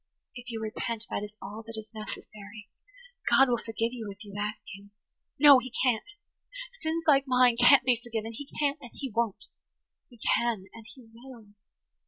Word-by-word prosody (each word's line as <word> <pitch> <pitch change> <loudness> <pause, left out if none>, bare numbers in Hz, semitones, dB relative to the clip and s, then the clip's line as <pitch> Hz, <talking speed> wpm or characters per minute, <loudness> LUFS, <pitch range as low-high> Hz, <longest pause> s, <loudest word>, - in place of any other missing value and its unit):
"If 245 0 -10
you 225 -2 -4
repent, 220 +1 -4
that - - -1
is 210 0 -7
all 205 +3 -7
that 225 -1 -7
is 220 0 -9
necessary. 215 0 -9 0.6
God 270 -1 +6
will 240 -1 +1
forgive 225 +1 -2
you 225 -4 -6
if 200 +2 -10
you 200 - -11
ask 210 +1 -2
Him." 200 +1 -11 0.5
"No, 285 -2 +9
He 255 0 -8
can't! 260 - 0 0.7
Sins 325 +1 -1
like 275 -3 +5
mine 250 -2 +4
can't 245 +3 +6
be 245 -2 +2
forgiven. 225 -1 -4
He 280 +5 -8
can't–and 285 -4 -2
He 270 -3 -5
won't." 225 -2 -1 0.6
"He 240 - -17
can 230 -3 0
and 225 -1 -12
He 255 -4 -16
will. 235 -2 -13
230 Hz, 175 wpm, -28 LUFS, 215-255 Hz, 0.7 s, No